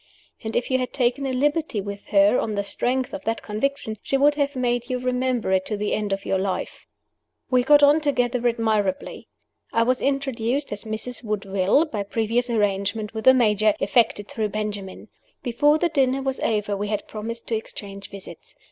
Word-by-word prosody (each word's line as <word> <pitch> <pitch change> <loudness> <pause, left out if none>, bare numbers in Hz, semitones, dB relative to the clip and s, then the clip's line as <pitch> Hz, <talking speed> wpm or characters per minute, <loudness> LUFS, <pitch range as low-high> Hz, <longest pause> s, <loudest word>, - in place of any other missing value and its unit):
And 220 0 -4
if 245 - -1
you 260 - +3
had 255 - -3
taken 255 +1 0
a - - -1
liberty 290 -1 0
with 200 0 -6
her, 200 +2 +4
on 215 - -2
the 200 - 0
strength 250 +6 -1
of 290 0 -5
that 225 0 -2
conviction, 220 +1 -2
she 275 - 0
would 290 +2 +5
have 285 -1 -1
made 245 -1 -1
you 255 - 0
remember 250 -3 -1
it 190 0 +3
to 210 - -2
the 210 0 -1
end 210 -1 -1
of 195 0 -2
your 190 - +1
life. 190 0 -3 0.6
We 250 -1 +5
got 290 +3 +5
on 290 +2 +6
together 250 -4 +1
admirably. 220 -5 -1 0.4
I 230 - +3
was 255 +2 +1
introduced 275 -1 -1
as 205 +1 -5
"Mrs. 220 +3 -5
Woodville," 200 - +1
by 220 -10 -4
previous 230 +4 -1
arrangement 205 -1 0
with 220 -1 -5
the 260 - +9
Major 215 -3 +3
effected 205 0 +2
through 215 -2 -2
Benjamin. 205 -2 -5 0.3
Before 290 +5 +3
the 345 - +2
dinner 270 -3 +1
was 265 -1 -1
over 210 -2 0
we 205 +1 -3
had 210 -1 -3
promised 230 +2 -6
to 230 - +1
exchange 200 -2 -7
visits. 195 -1 -10
230 Hz, 190 wpm, -24 LUFS, 205-260 Hz, 0.6 s, the